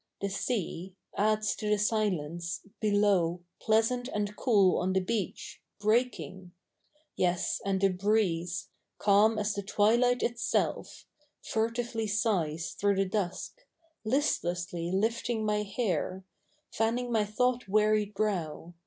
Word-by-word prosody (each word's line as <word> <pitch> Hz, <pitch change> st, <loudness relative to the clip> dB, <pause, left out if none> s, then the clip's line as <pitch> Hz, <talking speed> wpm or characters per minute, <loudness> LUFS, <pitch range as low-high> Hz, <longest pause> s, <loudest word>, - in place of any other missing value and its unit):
The 200 Hz, -, -2 dB
sea 190 Hz, -3 st, -3 dB, 0.2 s
Adds 215 Hz, 0 st, +1 dB
to 210 Hz, -, -3 dB
the 210 Hz, -, +3 dB
silence, 180 Hz, -6 st, -1 dB
below 200 Hz, -5 st, +2 dB, 0.2 s
Pleasant 225 Hz, +3 st, +2 dB
and 210 Hz, -4 st, -3 dB
cool 200 Hz, -7 st, +3 dB
on 185 Hz, +1 st, 0 dB
the 190 Hz, -, +3 dB
beach 195 Hz, 0 st, -4 dB, 0.2 s
Breaking; 195 Hz, -, -1 dB, 0.6 s
yes, 180 Hz, -1 st, 0 dB
and 195 Hz, 0 st, -1 dB
a 195 Hz, -, +5 dB
bi'eeze 180 Hz, -3 st, 0 dB, 0.3 s
Calm 210 Hz, +2 st, +4 dB
as 210 Hz, 0 st, 0 dB
the 200 Hz, -, -3 dB
twilight 235 Hz, +5 st, +2 dB
itself 235 Hz, 0 st, -1 dB, 0.4 s
Furtively 230 Hz, 0 st, -1 dB
sighs 180 Hz, -7 st, 0 dB
through 200 Hz, 0 st, +1 dB
the 195 Hz, +1 st, +2 dB
dusk. 195 Hz, -, -3 dB, 0.4 s
Listlessly 180 Hz, -, -1 dB
lifting 225 Hz, +3 st, 0 dB
niy 210 Hz, 0 st, +1 dB
hair. 190 Hz, -4 st, -1 dB, 0.5 s
Fanning 235 Hz, +2 st, 0 dB
my 220 Hz, -2 st, +3 dB
thonght 250 Hz, +3 st, 0 dB
wearied 210 Hz, 0 st, +2 dB
brow. 175 Hz, -5 st, -2 dB
205 Hz, 120 wpm, -30 LUFS, 185-220 Hz, 0.6 s, a